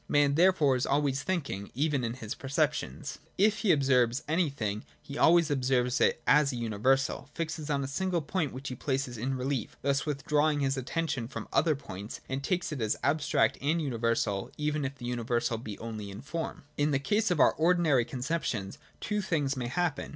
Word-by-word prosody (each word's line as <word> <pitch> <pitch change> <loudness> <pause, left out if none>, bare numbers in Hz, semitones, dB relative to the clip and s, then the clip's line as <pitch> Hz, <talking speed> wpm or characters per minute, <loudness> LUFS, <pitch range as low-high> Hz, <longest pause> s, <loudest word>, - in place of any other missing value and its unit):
Man, 145 -1 +3
therefore, 160 -4 +4
is 125 - -1
always 140 -1 +1
thinking, 140 - -3
even 145 -1 +1
in 115 0 -2
his 110 -4 -5
perceptions: 135 - -2 0.2
if 210 +2 +3
he 210 - +3
observes 130 -3 +3
anything, 140 - -1 0.2
he 140 - -9
always 165 0 +5
observes 125 -2 +1
it - - +2
as 150 -1 +5
a - - -5
universal, 120 +5 0
fixes 160 -2 -4
on 140 -2 +1
a - - -3
single 175 +3 -1
point 160 -3 -1
which 130 +2 -6
he 125 - -5
places 130 -1 -2
in 130 +4 -2
rehef, 130 -3 -1 0.2
thus 140 0 +1
withdrawing 150 +1 +1
his 135 -1 +1
attention 135 -2 -2
from - - -7
other 155 -2 +3
points, 105 -7 -8
and 135 +1 -3
takes 180 +1 -1
it 140 -5 -4
as 110 -1 0
abstract 150 +1 +2
and 155 +4 +1
uni 140 -6 -2
versal, 110 -4 0
even 150 -1 -1
if 140 +1 -4
the 125 -2 -9
universality 120 -1 -1
be 105 -4 -6
only 110 -3 -6
in 100 +1 -8
form. 160 +3 -5
In 145 +1 +2
the 140 - +2
case 210 +10 +1
of 175 -4 +1
our - - +6
ordinary 160 -6 +3
conceptions, 125 -5 -3 0.2
two 210 -1 -1
things 145 -7 0
may 125 -2 -3
happen. 155 +2 -1
140 Hz, 190 wpm, -30 LUFS, 125-155 Hz, 0.2 s, our